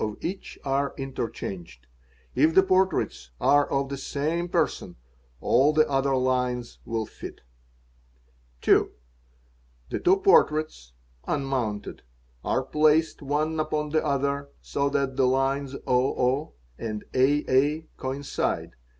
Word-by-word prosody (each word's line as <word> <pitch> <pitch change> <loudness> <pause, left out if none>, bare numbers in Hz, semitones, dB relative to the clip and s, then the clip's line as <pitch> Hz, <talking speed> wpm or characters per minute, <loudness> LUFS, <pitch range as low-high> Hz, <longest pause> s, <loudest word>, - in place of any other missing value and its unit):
of 105 -1 -2
each 190 +2 -5
are 140 +1 0
interchanged. 95 - -6 0.5
If 160 - +3
the 190 - +7
portraits 190 - +1
are 145 0 +4
of 135 0 0
the 140 - -4
same 155 +5 -2
rson - - -1 0.4
all 140 +5 +3
the 155 0 +4
other 135 0 +1
lines 125 -1 -1
will 115 -1 -2
fit. - - -9
_ - - -27 1.2
2. - - +4 1.0
The - - -1
two 370 +2 +4
portraits 155 - +2 0.3
(unmounted) 130 -8 -2 0.4
are 130 - 0
placed 155 +4 +2
one 150 +3 -1
upon 155 -1 -1
the 155 +1 +1
other, 140 -1 -1
so 140 0 -1
lat 140 -1 -1
the 130 -2 +4
lines 135 +1 0
00 130 +2 +1 0.3
and 110 -2 -4
aa 145 +3 +2
coincide. 135 +2 -2
140 Hz, 120 wpm, -26 LUFS, 130-150 Hz, 1.2 s, the